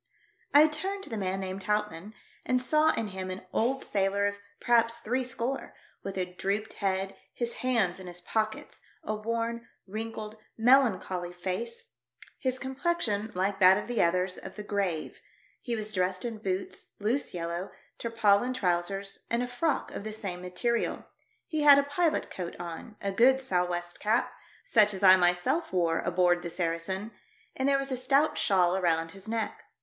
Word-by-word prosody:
I 295 +2 +8
turned 380 +6 -2
to 295 - -9
the 225 - -2
man 190 0 -1
named 190 0 -5
Houtmann, 210 -2 -2 0.3
and 255 - +1
saw 305 +5 +4
in 220 -2 -2
him 185 -1 -5
an 185 0 -6
old 265 +4 +1
sailor 200 0 +1
of 200 0 -1 0.2
perhaps 230 -1 +3
three 245 +3 -1
score, 255 +2 -3 0.3
with 195 - -6
a 185 - 0
drooped 195 +4 -3
head, 195 -1 -1 0.2
his 235 -1 -1
hands 225 -9 +1
in 185 - -9
his 175 0 -5
pockets, 215 +4 -3 0.2
a 215 - -2
worn, 230 +2 -3 0.2
wrinkled, 215 +1 -6 0.2
melancholy 225 -8 +3
face, 185 - -4 0.5
his 260 -1 0
complexion, 260 -6 -1
like 195 +2 0
that 190 0 +7
of 210 - -4
the 240 -3 +1
others, 180 +2 +1
of - - -9
the 210 - -6
grave; 195 -6 -2 0.4
he 240 -3 -3
was 215 -1 -3
dressed 185 +1 0
in 225 -2 -4
boots, 190 -2 -4
loose 230 +7 0
yellow, 170 +2 -3 0.3
tarpaulin 230 +1 +2
trousers, 195 -1 -1
and 235 +1 +1
a - - -2
frock 270 +5 -1
of - - -6
the 215 0 -5
same 195 -5 -5
material; 230 +6 -1 0.4
he 310 -2 -2
had 290 -1 +9
a 280 - +4
pilot 310 +3 0
coat 175 -2 -5
on, 175 +6 -7
a 200 - 0
good 255 +6 +5
sou' 185 -10 +1
west 175 0 -4
cap 220 +3 +1 0.2
— - - -28
such 210 -2 +4
as 190 - -7
I 185 -1 +10
myself 180 - +1
wore 170 -3 +1
aboard 175 0 +2
the 175 - -5
Saracen 175 +5 -2 0.2
— - - -34
and 265 +1 +1
there 275 - +4
was 275 0 -2
a - - +1
stout 275 +4 +2
shawl 185 -3 +3
around 165 -3 +1
his 195 +2 -11
neck. 225 0 -2
210 Hz, 175 wpm, -29 LUFS, 185-240 Hz, 0.5 s, I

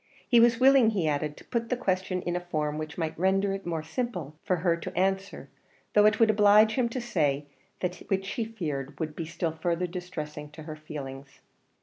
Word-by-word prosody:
He 240 - +6
was 235 0 +5
willing, 265 -3 +6
he 190 -7 0
added, 150 0 -1
to - - -14
put 230 -1 -2
the 250 - 0
question 185 -5 -1
in 175 - -2
a - - +1
form 155 -4 -2
which 155 0 -6
might 160 -2 -2
render 195 +2 +2
it 195 -2 -6
more 165 -2 -2
simple 160 - -4
for 185 - +1
her 170 0 +1
to 170 - -7
answer, 195 +1 -1 0.5
though 210 0 +6
it 215 0 +2
would 225 -2 +6
oblige 210 +1 +6
him 245 -1 +1
to 255 - -3
say 145 - 0 0.4
that 180 -1 -2
which 195 0 -1
he 235 - -2
feared 150 -11 -5
would 155 -2 -3
be 165 - -4
still 165 0 -2
further 170 +2 -1
distressing 155 -4 -6
to 155 - -9
her 155 0 -7
feelings. 140 -3 -9
180 Hz, 210 wpm, -28 LUFS, 155-210 Hz, 0.5 s, He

